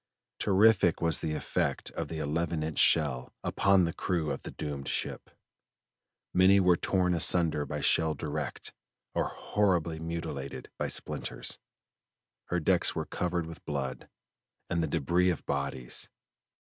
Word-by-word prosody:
Terrific 100 -3 +4
was 85 -2 +4
the 75 -1 -2
effect - - -2
of - - -4
the 80 - -6
eleven 80 +1 -1
inch 80 -1 -2
shell 70 -6 +3
upon 100 -1 +3
the 85 - -2
crew 85 -5 -1
of - - -4
the - - -7
doomed 70 -2 -5
ship: - - -3 1.0
many 95 +2 +6
were 90 -2 +5
torn 90 0 +1
asunder 80 -3 +3
by 75 -1 -4
shell 80 -1 +3
direct, 75 +1 -4 0.4
or - - 0
horribly 90 -6 0
mutilated 70 -5 -5
by - - 0
splinters. - - -1 0.9
Her 90 - -1
decks 80 - +2
were - - -2
covered 90 -1 -2
with 80 0 -10
blood 70 -4 -4 0.6
and 85 - +1
the 80 - 0
debris 85 +4 +2
of 90 - -2
bodies. 70 -3 -3
80 Hz, 140 wpm, -30 LUFS, 75-90 Hz, 1.0 s, many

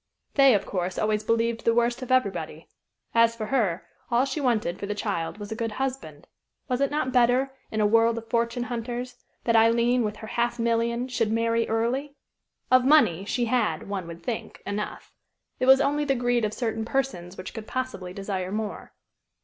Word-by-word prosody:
They, 275 -4 +6
of 200 - 0
course, 185 -1 -3
always 215 0 0
believed 230 +1 0
the 230 - +3
worst 240 +1 +1
of 255 - -5
everybody. 255 -7 0 0.5
As 230 0 +4
for 220 -2 -4
her, 210 -8 0 0.2
all 245 +2 +3
she 275 +3 -3
wanted 225 -9 0
for 200 - -4
the 210 - -2
child 200 -5 -3
was 205 0 -8
a - - -2
good 225 -1 -3
husband. 265 +2 -4 0.4
Was 250 -1 -1
it 275 - +3
not 290 -3 -1
better, 250 +2 +3 0.2
in 220 - -1
a - - +4
world 230 +2 +4
of 230 0 -6
fortune 235 +1 0
hunters, 245 +1 -5 0.2
that 230 - +2
Aileen, 235 +2 +4
with 210 -1 -2
her 220 - -9
half 235 +2 -1
million, 235 +1 0
should 225 -4 0
marry 230 0 +1
early? 250 +6 -1 0.6
Of 255 0 +6
money, 250 - +4
she 240 +3 0
had, 245 +1 0
one 195 -4 -4
would 170 0 -9
think, 240 -3 -5
enough. 210 +1 -5 0.5
It 255 - 0
was 265 0 +8
only 285 +1 +1
the 275 -2 +1
greed 245 -2 +1
of 210 - -2
certain 225 -2 -2
persons 220 -8 -2
which 185 - -7
could 220 -1 -7
possibly 255 -9 -4
desire 190 -1 -4
more. 215 0 -4
230 Hz, 190 wpm, -26 LUFS, 215-250 Hz, 0.6 s, was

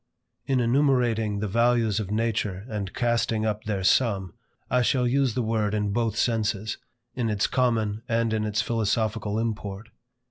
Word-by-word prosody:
In 135 -2 +2
enumerating 120 -5 +2
the 105 - -1
values 115 0 +2
of 100 -3 -4
nature 105 -3 -1
and 105 -5 -4
casting 115 -2 0
up 105 -1 -2
their 100 -3 -2
sum, 95 -4 +2 0.3
I 125 0 +2
shall 125 0 +2
use 130 -2 +1
the 125 - 0
word 110 -2 0
in 105 -1 -1
both 115 -1 0
senses; 110 -3 0 0.3
in 120 -3 -1
its 105 -2 +1
common 115 -5 0
and 115 -1 +1
in 110 -1 0
its 110 0 0
philosophical 110 -1 -1
import. 105 -2 -4
110 Hz, 155 wpm, -26 LUFS, 105-120 Hz, 0.3 s, In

